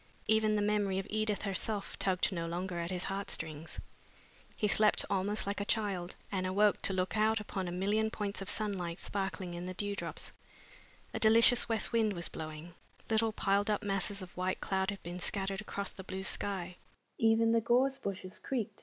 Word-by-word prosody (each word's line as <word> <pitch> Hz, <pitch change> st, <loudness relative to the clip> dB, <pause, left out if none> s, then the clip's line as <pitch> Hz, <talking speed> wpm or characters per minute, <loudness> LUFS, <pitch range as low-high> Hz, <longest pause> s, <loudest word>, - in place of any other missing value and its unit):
Even 220 Hz, -1 st, +3 dB
the 205 Hz, -, +2 dB
memory 205 Hz, -2 st, +1 dB
of 195 Hz, -, -1 dB
Edith 215 Hz, -1 st, 0 dB
herself 200 Hz, +1 st, -2 dB
tugged 190 Hz, -1 st, +2 dB
no 170 Hz, -2 st, -2 dB
longer 175 Hz, +1 st, -3 dB
at 170 Hz, 0 st, -2 dB
his 180 Hz, -1 st, -2 dB
heartstrings. 160 Hz, -5 st, -3 dB, 0.8 s
He 210 Hz, -, +1 dB
slept 210 Hz, +1 st, +5 dB
almost 200 Hz, +2 st, +1 dB
like 200 Hz, +1 st, -2 dB
a -, -, +1 dB
child, 200 Hz, -4 st, -1 dB, 0.2 s
and 185 Hz, -2 st, 0 dB
awoke 205 Hz, +2 st, +3 dB
to 195 Hz, -, +1 dB
look 185 Hz, +1 st, 0 dB
out 215 Hz, 0 st, +3 dB
upon 195 Hz, -3 st, -4 dB
a -, -, -3 dB
million 205 Hz, +5 st, +1 dB
points 205 Hz, -2 st, -3 dB
of 195 Hz, -, -4 dB
sunlight 190 Hz, -5 st, -1 dB
sparkling 195 Hz, -3 st, -3 dB
in 175 Hz, +1 st, -5 dB
the 185 Hz, -, -5 dB
dewdrops. 205 Hz, +1 st, -2 dB, 0.8 s
A -, -, -2 dB
delicious 230 Hz, +3 st, +6 dB
west 225 Hz, -1 st, +1 dB
wind 225 Hz, -3 st, +2 dB
was 170 Hz, -2 st, -3 dB
blowing. 155 Hz, +2 st, -7 dB, 0.4 s
Little 220 Hz, 0 st, +3 dB
piled 200 Hz, 0 st, +1 dB
up 210 Hz, -, +1 dB
masses 200 Hz, 0 st, 0 dB
of 180 Hz, -, -12 dB
white 185 Hz, +1 st, -1 dB
cloud 190 Hz, 0 st, 0 dB
had 200 Hz, -1 st, -5 dB
been 175 Hz, +1 st, -5 dB
scattered 195 Hz, +2 st, -1 dB
across 200 Hz, -1 st, -4 dB
the 190 Hz, -, -9 dB
blue 190 Hz, 0 st, -5 dB
sky. 190 Hz, -2 st, -2 dB
195 Hz, 170 wpm, -33 LUFS, 185-210 Hz, 0.8 s, delicious